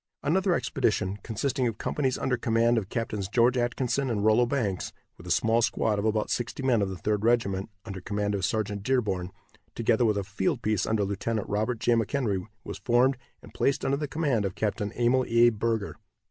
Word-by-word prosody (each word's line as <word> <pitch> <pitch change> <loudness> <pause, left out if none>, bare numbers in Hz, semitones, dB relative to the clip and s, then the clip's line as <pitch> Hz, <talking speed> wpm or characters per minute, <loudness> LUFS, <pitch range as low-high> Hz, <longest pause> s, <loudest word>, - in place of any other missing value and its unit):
Another 180 +5 +2
expedition, 105 - 0
consisting 125 +4 -1
of 115 -2 -3
companies 130 0 -1
under 130 - 0
command 115 0 +2
of 100 -3 -8
Captains 115 -5 -3
George 120 +4 +3
Atkinson 125 +2 0
and 105 -3 -1
Rollo 110 +3 +4
Banks, 115 -9 -1 0.2
with - - -13
a - - -6
small 115 +1 +3
squad 110 -2 +1
of 100 - -2
about 110 -1 0
sixty 120 +3 -3
men 125 -5 +3
of 100 - 0
the 95 - -5
Third 105 +2 -1
Regiment, 110 -4 +1 0.2
under 95 -4 -6
command 105 +1 -2
of 100 -2 -2
Sergeant 105 +1 -1
Dearborn, 100 -7 0 0.5
together 115 0 +2
with 105 -3 +2
a 100 - -1
field 120 - -2
piece 110 -3 0
under 110 -2 +1
Lieutenant 100 +2 -2
Robert 110 +4 -1
J. 120 +2 +1
McHenry, 115 -4 0 0.2
was - - -7
formed, 125 +3 +3 0.3
and - - -14
placed 140 - 0
under 140 - +1
the 150 0 -3
command 140 -6 0
of 95 -2 -3
Capt. 105 -1 -1
Emil 120 +5 +1
A. 115 +1 +5
Burger. 110 -1 -2
115 Hz, 195 wpm, -27 LUFS, 105-125 Hz, 0.5 s, A